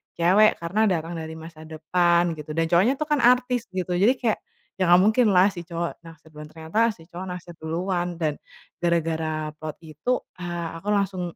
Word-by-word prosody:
cewek 190 +6 +4
karena 210 +6 +1
datang 170 -3 -1
dari 160 0 -7
masa 160 -1 -11
depan 170 +2 +2 0.2
gitu. 150 0 -7
Dan 165 0 0
cowoknya 190 +9 +4
tuh 305 +2 -4
kan 295 - +3
artis 250 -1 +3
gitu. 180 -1 -2
Jadi 195 +8 +4
kayak, 235 -4 -1 0.4
ya 185 - +2
nggak 175 +1 +7
mungkinlah 210 -4 +4
si 175 -3 -9
cowok 170 -1 -4
naksir 160 -1 -15
duluan. 150 0 -10
Ternyata 160 +6 -3 0.2
si 165 - -16
cowok 180 +2 -6
naksir 175 -1 -10
duluan 175 +3 -2
dan 155 -3 -2 0.4
gara-gara 160 -2 -1
plot 155 -1 -6
itu, 160 +11 -2 0.2
ah 175 -2 -4
aku 200 - -13
langsung 190 -4 -1
175 Hz, 180 wpm, -24 LUFS, 160-195 Hz, 0.4 s, nggak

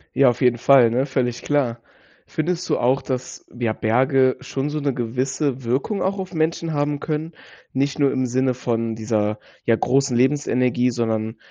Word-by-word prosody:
Ja, 135 -2 +6
auf 120 +2 -3
jeden 125 -1 +3
Fall, 125 -2 +6
ne, 130 +3 +1
völlig 125 -3 -1
klar. 130 -5 0 0.5
Findest 175 +3 -2
du - - +2
auch, 130 +3 +2
dass, 130 -1 -5
ja, 115 -3 0
Berge 130 +4 +2
schon 135 +2 -3
so 150 +1 -2
'ne 140 -2 0
gewisse 130 +3 -2
Wirkung 135 - -1
auch 195 +1 -1
auf 185 -1 -6
Menschen 160 0 -1
haben 145 0 0
können, 155 +2 -3 0.4
nicht 140 +3 0
nur 140 -2 +3
im 130 -1 0
Sinne 130 +1 +1
von 115 -2 -2
dieser, 110 -1 -1 0.3
ja, 115 - +4
großen 135 0 +1
Lebensenergie, 125 -2 +2
sondern, 110 -1 -2
130 Hz, 170 wpm, -22 LUFS, 120-145 Hz, 0.5 s, Ja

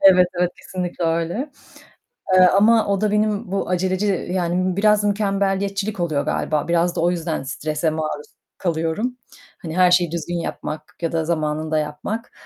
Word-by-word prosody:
Evet 185 -2 +7
evet, 180 - +2
kesinlikle 180 -1 -4
öyle, 170 - -1 0.8
eee, 185 - +7
ama 215 +4 +4
o 200 0 0
da 215 - +2
benim 210 -2 0
bu 195 - -1
aceleci 185 +2 0
yani 180 0 0
biraz 210 0 +4
mükemmeliyetçilik 200 0 0
oluyor 155 -5 0
galiba. 150 +1 -1
Biraz 170 +1 +1
da - - -1
o 175 - +3
yüzden 165 -4 -2
strese 155 +3 -2
maruz 155 -1 -3 0.3
kalıyorum, 175 +8 -1 0.4
hani 165 0 -5
her 180 -1 +5
şeyi 175 -2 +3
düzgün 170 +1 -3
yapmak 155 -2 -6
ya 165 - -1
da 165 -1 0
zamanında 155 -1 -1
yapmak, 150 +10 -4
180 Hz, 155 wpm, -21 LUFS, 160-200 Hz, 0.8 s, Evet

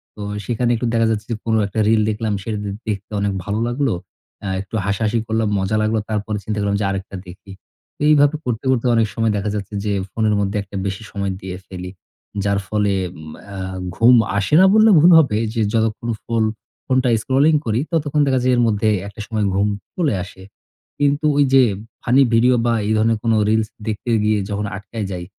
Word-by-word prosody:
তো 105 - -9 0.2
সেইখানে 120 0 0
একটু 120 +1 -2
দেখা 115 0 +3
যাচ্ছে 105 -1 -2
যে - - 0
কোন 115 -1 +1
একটা 100 +2 -4
রিল 110 0 +4
দেখলাম 110 0 -2
সেটা 110 0 -3
দে 100 - -3 0.2
দেখতে 100 -1 -4
অনেক 100 -1 0
ভালো 105 +1 -2
লাগলো। 130 +1 0 0.5
অ্যা 100 - -4
একটু 100 +3 -8
হাসাহাসি 105 +3 0
করলাম, 110 -1 0
মজা 95 +3 -1
লাগলো। 110 +1 +1
তারপরে 105 0 -2
চিন্তা 105 +2 -3
করলাম 100 0 0
যে - - 0
আরেকটা 95 0 -5
দেখি। 95 +2 -12 0.5
তো - - -16
এইভাবে 145 0 +4
করতে, 120 0 -3
করতে 130 -1 0
অনেক 115 -1 +3
সময় 115 +1 +1
দেখা 100 +1 -2
যাচ্ছে 105 0 -5
যে, 105 - 0 0.2
ফোনের 110 -2 +1
মধ্যে 100 0 -1
একটা 100 0 -13
বেশি 95 +3 -4
সময় 100 -2 -2
দিয়ে 95 -1 -6
ফেলি। 90 -1 -7 0.5
যার 100 0 +1
ফলে 105 -1 0 0.3
উম 80 0 -10
অ্যা 100 -1 -8 0.4
ঘুম 120 +4 +6 0.2
আসে 100 +8 -1
না 190 - +7
বললে 220 +1 +6
ভুল 165 +4 +6
হবে। 135 -9 +2 0.2
যে 115 - -1
যতক্ষণ 115 +1 -1
ফোল 115 -1 0 0.4
ফোনটা 130 -1 +1
স্ক্রলিং 140 +6 +3
করি, 110 0 0
ততক্ষণ 150 -2 +1
দেখা 130 -1 +2
যায় 130 0 +3
এর 120 - +2
মধ্যে 110 0 +1 0.2
একটা 100 +2 -12
সময় 110 -2 -1
ঘুম 100 +1 +2 0.3
চলে 160 -9 +1
আসে। 95 0 -12 0.6
কিন্তু 145 +1 +1
ওইযে 135 -2 +5 0.4
ফানি 125 +3 +3
ভিডিও 125 +2 +4
বা, 120 - +2
এই 110 - +1
ধরনের 110 +1 +2
কোন 115 -1 +2 0.2
রিলস 110 -1 +1 0.2
দেখতে 110 +2 -3
গিয়ে 105 0 +2
যখন 105 0 -2
আটকায় 105 +2 -6
যাই, 90 -1 -5
110 Hz, 200 wpm, -20 LUFS, 100-120 Hz, 0.6 s, না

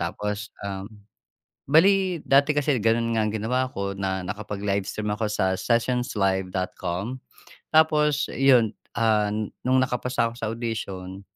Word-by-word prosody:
Tapos, 105 0 -3 0.2
um, 95 0 -5 0.8
bale 185 +3 +4
dati 140 +2 +4
kasi 145 -1 +2
ganun 115 +1 +2
nga 110 - +2
ang 105 - -1
ginawa 125 +4 0
ko 100 0 -3
na 95 -1 -2
nakapag-live 100 0 -2
stream 105 -1 -3
ako 110 0 -2
sa 95 -2 +1
Sessionslive.com. 100 -3 -1 0.5
Tapos, 150 -2 +4
’yun, 125 -5 +4 0.2
ah, 110 -2 +2 0.4
nung 130 0 +4
nakapasa 125 -2 0
ako - - -12
sa 110 - -2
audition, 100 -5 -5
110 Hz, 125 wpm, -25 LUFS, 100-130 Hz, 0.8 s, bale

